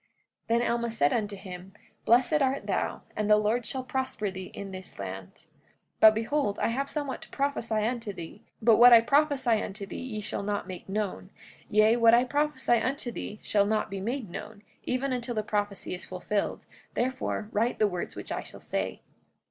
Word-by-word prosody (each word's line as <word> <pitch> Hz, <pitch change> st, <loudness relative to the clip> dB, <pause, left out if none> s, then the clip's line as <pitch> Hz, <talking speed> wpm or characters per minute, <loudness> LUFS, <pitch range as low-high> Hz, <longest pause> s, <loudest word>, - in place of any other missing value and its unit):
45:8 -, -, -40 dB, 0.5 s
Then 240 Hz, -, +1 dB
Alma 235 Hz, 0 st, 0 dB
said 145 Hz, -11 st, +2 dB
unto 210 Hz, -3 st, -1 dB
him: 190 Hz, -1 st, -9 dB, 0.3 s
Blessed 255 Hz, +6 st, +4 dB
art 270 Hz, +1 st, +1 dB
thou; -, -, -1 dB
and 210 Hz, 0 st, -1 dB
the 210 Hz, -, +7 dB
Lord 215 Hz, +2 st, 0 dB
shall 260 Hz, -1 st, -3 dB
prosper 260 Hz, -7 st, -2 dB
thee 185 Hz, 0 st, -7 dB
in 195 Hz, -1 st, -6 dB
this 185 Hz, -1 st, -8 dB
land. 95 Hz, -1 st, -6 dB
45:9 -, -, -23 dB, 0.5 s
But 220 Hz, 0 st, +8 dB
behold, 225 Hz, -1 st, 0 dB
I -, -, +1 dB
have 275 Hz, +4 st, -2 dB
somewhat 285 Hz, -3 st, -3 dB
to -, -, -10 dB
prophesy 235 Hz, -6 st, -1 dB
unto 230 Hz, -2 st, -2 dB
thee; 170 Hz, +2 st, -9 dB, 0.2 s
but 225 Hz, -1 st, +6 dB
what 245 Hz, +1 st, +9 dB
I 230 Hz, -, +9 dB
prophesy 270 Hz, -3 st, +3 dB
unto 200 Hz, +1 st, -5 dB
thee -, -, -7 dB
ye 245 Hz, -5 st, -5 dB
shall 210 Hz, -, -4 dB
not 205 Hz, 0 st, -2 dB
make 185 Hz, 0 st, -8 dB
known; 200 Hz, -2 st, -3 dB, 0.4 s
yea, 215 Hz, +2 st, +5 dB
what 230 Hz, -1 st, +7 dB
I 240 Hz, -, +5 dB
prophesy 290 Hz, -3 st, +1 dB
unto 255 Hz, 0 st, -2 dB
thee 210 Hz, -2 st, -6 dB
shall 200 Hz, -1 st, +2 dB
not 215 Hz, -1 st, 0 dB
be 195 Hz, -, -3 dB
made 240 Hz, +3 st, -3 dB
known, 210 Hz, +4 st, -8 dB, 0.2 s
even 255 Hz, +1 st, 0 dB
until 240 Hz, -1 st, -3 dB
the 215 Hz, -, 0 dB
prophecy 205 Hz, -2 st, -2 dB
is 180 Hz, -, -5 dB
fulfilled; 185 Hz, +3 st, -2 dB, 0.3 s
therefore 250 Hz, -4 st, -1 dB
write 230 Hz, +3 st, +1 dB
the 215 Hz, -, +4 dB
words 180 Hz, -3 st, -4 dB
which -, -, -7 dB
I -, -, -2 dB
shall -, -, -12 dB
say. -, -, -3 dB
220 Hz, 195 wpm, -28 LUFS, 205-250 Hz, 0.5 s, what